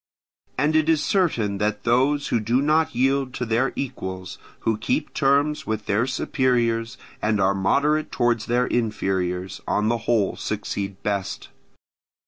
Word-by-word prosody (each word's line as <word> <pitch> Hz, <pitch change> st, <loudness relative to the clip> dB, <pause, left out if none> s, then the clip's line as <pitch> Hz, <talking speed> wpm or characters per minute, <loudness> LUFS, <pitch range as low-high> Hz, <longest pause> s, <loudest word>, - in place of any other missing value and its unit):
And 150 Hz, +4 st, +2 dB
it 155 Hz, 0 st, +3 dB
is 160 Hz, -2 st, +2 dB
certain 115 Hz, -, +1 dB
that 105 Hz, 0 st, -1 dB
those 135 Hz, +5 st, +2 dB
who 120 Hz, -, +2 dB
do 115 Hz, +4 st, +1 dB
not 155 Hz, 0 st, +2 dB
yield 135 Hz, +1 st, +1 dB
to 125 Hz, -, -2 dB
their 115 Hz, +4 st, +1 dB
equals, 95 Hz, -8 st, -5 dB, 0.2 s
who 110 Hz, -1 st, 0 dB
keep 145 Hz, +7 st, -1 dB
terms 145 Hz, +1 st, +1 dB
with 110 Hz, -1 st, -2 dB
their 110 Hz, +5 st, +1 dB
superiors, 120 Hz, -4 st, 0 dB, 0.2 s
and 105 Hz, -1 st, +1 dB
are 95 Hz, 0 st, +3 dB
moderate 145 Hz, +11 st, +1 dB
towards 120 Hz, -2 st, +1 dB
their 120 Hz, +1 st, +2 dB
inferiors, 95 Hz, -6 st, -1 dB
on 105 Hz, +1 st, +1 dB
the 120 Hz, 0 st, +1 dB
whole 110 Hz, -5 st, +2 dB
succeed 100 Hz, -1 st, -4 dB
best. 100 Hz, -2 st, -3 dB
120 Hz, 145 wpm, -23 LUFS, 105-140 Hz, 0.2 s, it